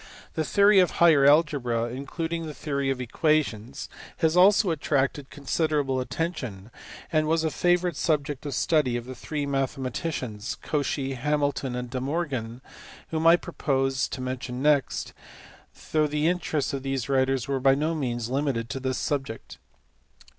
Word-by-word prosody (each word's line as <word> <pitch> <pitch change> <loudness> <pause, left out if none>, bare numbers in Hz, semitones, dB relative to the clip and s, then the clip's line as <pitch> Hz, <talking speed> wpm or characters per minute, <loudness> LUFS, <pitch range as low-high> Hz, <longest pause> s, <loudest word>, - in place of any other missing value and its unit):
The 160 - -1
theory 200 +4 +5
of 180 - +4
higher 155 -5 +6
algebra 145 -6 +3
(including 160 +6 -4
the 150 - -7
theory 140 -2 -2
of 135 -1 -1
equations) 135 -2 -1 0.3
has 160 0 +2
also 190 +1 +5
attracted 140 -2 -1
considerable 145 -2 0
attention, 125 - -4 0.4
and 155 -2 +2
was 160 +1 +2
a 160 - 0
favourite 175 0 +1
subject 145 -3 -1
of 140 - -3
study 150 -8 +2
of 120 - -6
the 130 - -7
three 145 +2 -4
mathematicians, 135 -3 -3
Cauchy, 140 -2 -1
Hamilton, 140 -1 -1
and 125 -1 -5
De 130 -1 -3
Morgan 130 -5 -3 0.5
whom 160 0 +1
I 165 - +9
propose 135 -6 -1
to 130 - -6
mention 130 0 -4
next 145 -2 +1 0.8
though 155 -1 +3
the 150 +1 0
interests 165 -5 -1
of 135 - -2
these 135 -2 -2
writers 135 -2 +1
were 135 -1 0
by 135 +1 +4
no 155 +4 0
means 120 -6 -2
limited 130 -3 -1
to 135 - -3
this 130 -1 -2
subject. 135 -5 -4
140 Hz, 150 wpm, -26 LUFS, 130-155 Hz, 0.8 s, I